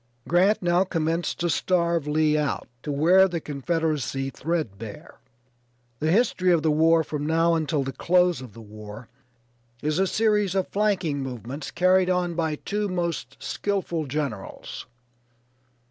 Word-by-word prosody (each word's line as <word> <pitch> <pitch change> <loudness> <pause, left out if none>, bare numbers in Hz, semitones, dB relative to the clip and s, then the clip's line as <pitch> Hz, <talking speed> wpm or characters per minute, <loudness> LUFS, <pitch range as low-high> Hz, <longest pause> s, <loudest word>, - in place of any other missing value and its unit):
Grant 185 +4 +3
now 175 +1 +3
commenced 165 -2 -1
to 175 - +1
starve 170 -2 +1
Lee 155 0 +2
out, 150 -2 -1
to 150 - -4
wear 175 +7 +5
the 175 -2 -3
Confederacy 145 -2 -2
threadbare. 115 - -5 0.8
The 155 - 0
history 185 -2 +3
of 165 -3 +3
the 160 - +3
war 160 +2 +4
from 150 -1 -4
now 165 +1 +3
until 155 -3 0
the 135 - -4
close 180 +3 +2
of 125 -5 -10
the 115 - -11
war 105 +2 -10 0.7
is 155 +3 0
a 190 - +3
series 210 -2 +1
of 190 - +1
flanking 190 -9 0
movements 130 +2 -6
carried 185 +1 +3
on 180 -1 0
by 160 -2 -1
two 205 +6 -3
most 170 -8 -3
skillful 180 -6 -2
generals. 135 -8 -5
165 Hz, 145 wpm, -25 LUFS, 145-180 Hz, 0.8 s, wear